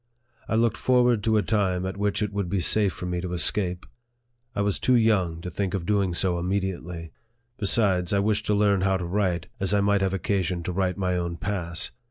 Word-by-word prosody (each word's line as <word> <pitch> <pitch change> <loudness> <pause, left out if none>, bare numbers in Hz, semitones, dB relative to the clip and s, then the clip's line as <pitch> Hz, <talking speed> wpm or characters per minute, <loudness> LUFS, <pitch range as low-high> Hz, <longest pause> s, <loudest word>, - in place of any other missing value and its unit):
I - - -1
looked 115 0 +2
forward 125 -4 +3
to 110 -1 +2
a 105 - +2
time 95 -1 0
at 95 - -3
which 105 +1 0
it 105 -1 -3
would 100 -3 -2
be 100 - 0
safe 100 +4 +2
for 90 - -7
me 90 -1 -2
to 90 -1 -4
escape. 90 +1 0 0.7
I 100 - 0
was 100 -1 0
too 130 - +3
young 95 -8 +2
to 90 - -6
think 95 +2 -2
of 90 -3 -3
doing 100 -3 +1
so 90 -1 +1
immediately; 90 -3 -3 0.5
besides, 95 -4 +2
I 100 - +2
wished 105 +1 0
to 105 - +2
learn 100 -2 +3
how 95 0 +2
to 90 - -4
write, 90 -2 -1
as 95 +1 +1
I 100 - +3
might 100 0 +2
have 95 0 0
occasion 90 -2 -1
to 90 - -3
write 90 0 -1
my 90 -2 0
own 85 -1 -3
oass. 85 -4 -2
95 Hz, 220 wpm, -25 LUFS, 90-105 Hz, 0.7 s, forward